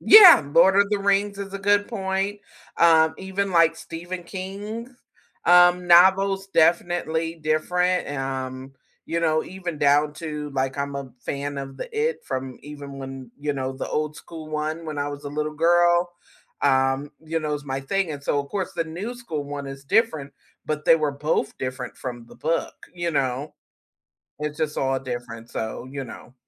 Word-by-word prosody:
Yeah, 385 - +10
Lord 175 +4 +6
of 200 0 +5
the 210 - +1
Rings 200 0 +1
is 195 -1 -6
a - - -3
good 205 +1 +3
point, 195 -1 -2 0.4
um, 160 -1 +5
even 190 +1 -2
like 165 -1 +4
Stephen 175 +2 -7
King's, 205 +6 -6 0.5
um, 175 0 +6
novels, 195 +2 +5
definitely 165 -1 +1
different, 180 +4 0
um, 135 -1 -4 0.3
you 170 +1 -1
know, 155 -1 +2
even 180 -4 -6
down 145 +1 +3
to 150 -2 -5
like 135 0 -1
I'm 140 0 -2
a 135 -2 -6
fan 140 0 -4
of 135 -1 -7
the - - -6
It 465 +1 0
from 130 -1 -4
even 145 -1 -9
when, 135 -2 -8
you 145 0 -1
know, 135 -1 -3
the 130 - -5
old 150 0 -2
school 160 -2 -10
one 155 +2 -3
when 155 -2 -4
I 145 - -1
was 145 0 -7
a - - -3
little 150 +1 -3
girl, 175 +2 +3 0.5
um, 135 +1 +2
you 165 +1 -1
know, 150 -1 -1
it's 145 -1 -6
my 135 -1 -3
thing, 185 +6 -1
and 140 - -7
so 145 - +1
of 140 - -8
course 190 0 -3
the 165 -1 -1
new 185 +10 -5
school 165 -12 -5
one 140 0 -6
is 135 0 -8
different, 155 - +1 0.3
but 150 0 -2
they 165 - +6
were 150 -3 0
both 145 0 -1
different 130 -1 -5
from 120 -2 -7
the - - -15
book, 165 +2 -1 0.2
you 175 -1 -2
know. 135 -1 -1 0.8
It's 150 0 -4
just 155 -1 -1
all 135 0 +1
different, 120 -3 -6
so, 110 +3 -5
you 135 0 -5
know. 125 +1 -11
155 Hz, 180 wpm, -24 LUFS, 140-180 Hz, 0.8 s, Yeah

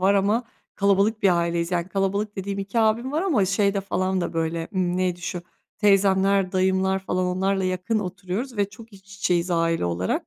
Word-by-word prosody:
var 195 +2 +4
ama 210 +5 +2 0.3
kalabalık 200 +2 +2
bir 185 -3 +4
aileyiz. 170 0 -1
Yani 175 0 -1
kalabalık 200 +2 -1
dediğim 195 +1 -4
2 195 +4 -2
abim 225 +4 +1
var 315 +4 0
ama 290 - +2
şeyde 200 +1 +1
falan 190 -1 -1
da - - -3
böyle, 165 0 -2
ımm, 180 -1 0
neydi 180 -1 -1
şu, 175 0 -4 0.4
teyzemler, 195 -2 +3
dayımlar 190 0 +2
falan, 185 -1 -2
onlarla 190 +1 0
yakın 185 +4 -1
oturuyoruz 195 +5 -4
ve 200 -1 +1
çok 220 +2 -14
iç 200 +1 -15
içeyiz 180 -3 0
aile 165 - +1
olarak. 85 +1 -1
190 Hz, 180 wpm, -24 LUFS, 180-200 Hz, 0.4 s, var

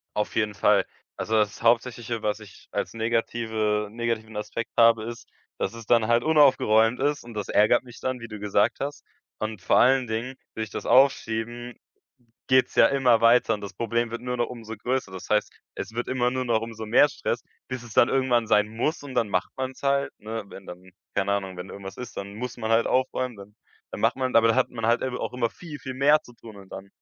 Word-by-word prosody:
Auf 105 - -2
jeden 105 -2 +1
Fall. - - +3 0.3
Also, 110 - -2
das 105 -1 +1
Hauptsächliche, 120 -1 +1
was 105 +1 -1
ich 105 - -15
als 90 - -3
negative 110 -2 -1
negativen 115 -1 -3
Aspekt 105 +2 -4
habe, 115 -1 +5
ist, 120 0 -8 0.3
dass - - -2
es 115 -2 -10
dann 115 -2 +3
halt 120 0 +3
unaufgeräumt 130 -7 +4
ist 145 0 0
und 120 -1 -11
das 105 -2 -4
ärgert 110 +4 +4
mich 120 -2 -13
dann, 130 -1 -2
wie 115 - -8
du 105 -2 -8
gesagt 105 -1 +1
hast. 145 +1 -5 0.3
Und 110 -3 -4
vor - - +3
allen 130 0 +4
Dingen, 115 +4 -3 0.2
will 110 - -3
ich - - -14
das - - -6
aufschieben, 120 -2 +2 0.7
geht's 130 -1 +3
ja - - +7
immer 130 -4 +3
weiter 115 -1 +5
und 105 - -6
das 100 - -7
Problem 115 0 -1
wird 115 - -5
nur 125 0 -3
noch 120 - 0
umso 115 -2 -8
größer. 125 -3 -2
Das 95 - -8
heißt, 105 0 +2 0.3
es - - -6
wird 120 +1 -3
immer 125 -1 +1
nur 130 0 -1
noch 115 -3 +1
umso 110 -1 -7
mehr 135 +6 +5
Stress, - - -3 0.3
bis 130 -1 -5
es 115 - -11
dann 120 - +5
irgendwann 125 -4 +2
sein 105 -1 +3
muss 125 +9 -2
und 135 - -8
dann 115 - +1
macht 90 -2 -1
man's 130 0 -4
halt, 140 0 +1
ne? 110 +1 -5
Wenn 95 - -12
dann 90 +1 -11 0.2
keine 100 +1 +1
Ahnung, 95 -2 -2
wenn 90 +2 -7
irgendwas 95 -1 -9
ist, 125 - -8
dann 100 +1 -6
muss 125 +3 -5
man 110 -1 -3
halt 115 +1 +3
aufräumen, 130 -2 0
dann 100 +1 -13 0.4
dann - - -6
macht - - +2
man 130 -1 -2
aber 115 0 +6
dann 115 - +3
hat 130 - +2
man 115 -2 -4
halt 120 +1 +2
ebe 130 -1 -3
auch - - -3
immer 120 -2 0
viel, 155 -4 -10
viel 130 -2 -7
mehr 145 +3 +4
zu 120 - -16
tun 110 -2 -13
und 95 -1 -13
dann 100 - -8
115 Hz, 225 wpm, -25 LUFS, 110-125 Hz, 0.7 s, ja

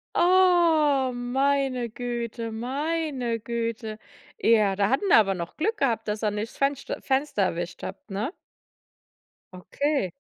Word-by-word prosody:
Oh, 335 -7 +4
meine 255 0 0
Güte, 235 -1 -4
meine 265 0 -2
Güte. 230 -1 -4 0.4
Ja, 215 - +4
da 200 +1 +1
hatten 275 +10 +1
wir - - +7
aber 195 -3 +3
noch 170 -1 -6
Glück 435 +8 -1
gehabt, 230 -5 0
dass 210 +1 -3
er 210 - +2
nicht 210 +2 -4
Fenscht 275 0 -1
Fenster 265 -6 0
erwischt 175 -1 -3
habt, 290 - -8
ne? 215 - -3 1.2
Okay. 200 - -1
245 Hz, 130 wpm, -26 LUFS, 215-285 Hz, 1.2 s, wir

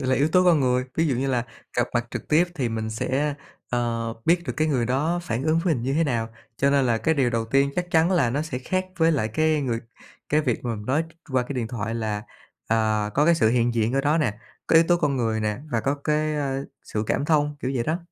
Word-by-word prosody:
là 130 -1 +1
yếu 145 +4 +2
tố 180 +3 +4
con 170 -5 +5
người. 125 -1 +2
Ví 165 0 +2
dụ 135 - +1
như 135 +2 -1
là 125 -2 0 0.3
gặp 120 0 +2
mặt 120 0 +1
trực - - -6
tiếp 160 +3 +5
thì 130 -6 -1
mình 110 -1 -3
sẽ, 140 +6 -1 0.4
ờ, 115 -1 -1
biết 170 +1 +3
được - - -1
cái 155 0 +1
người 125 -6 +1
đó 150 +7 0
phản 115 -4 -2
ứng 160 +1 +2
với 165 -2 +1
mình 115 - -4
như 135 +3 -1
thế 165 +1 +2
nào. 115 -5 -1 0.3
Cho 140 0 +2
nên 140 -2 +3
là 115 -2 +2
cái 160 - +1
điều 130 -5 +2
đầu 115 -1 0
tiên 135 +4 +2
chắc 180 0 -2
chắn 165 +2 +3
là 140 -11 +3
nó 145 +4 -1
sẽ 130 -5 -4
khác 185 +8 -2
với 165 -1 +3
lại 110 -7 0
cái 155 +6 +1
người 120 -4 -1 0.5
cái 150 +1 +3
việc 125 -6 -1
mà 120 -2 -1
mình 105 0 -8
nói 145 +5 +2 0.3
qua 130 -1 +2
cái 135 +3 -6
điện 120 -3 -2
thoại 115 -2 -3
là, 105 -2 -2 0.5
à, 110 -2 +1
có 145 - +3
cái 170 +1 +5
sự 110 -9 +3
hiện 120 0 +2
diện 115 +1 +1
ở 135 - +2
đó 150 +3 +2
nè, 110 -9 0 0.3
có - - +1
yếu 165 - +7
tố 175 - +5
con 150 -5 0
người 110 -2 0
nè 105 +1 -1
và 115 -2 +1
có 140 +4 0
cái, 150 +1 -1
ơ, 140 -2 -2 0.2
sự 105 0 -3
cảm - - 0
thông, 150 -1 +1
kiểu 130 - -2
vậy 120 -2 0
đó. 160 +3 0
135 Hz, 270 wpm, -24 LUFS, 115-155 Hz, 0.5 s, yếu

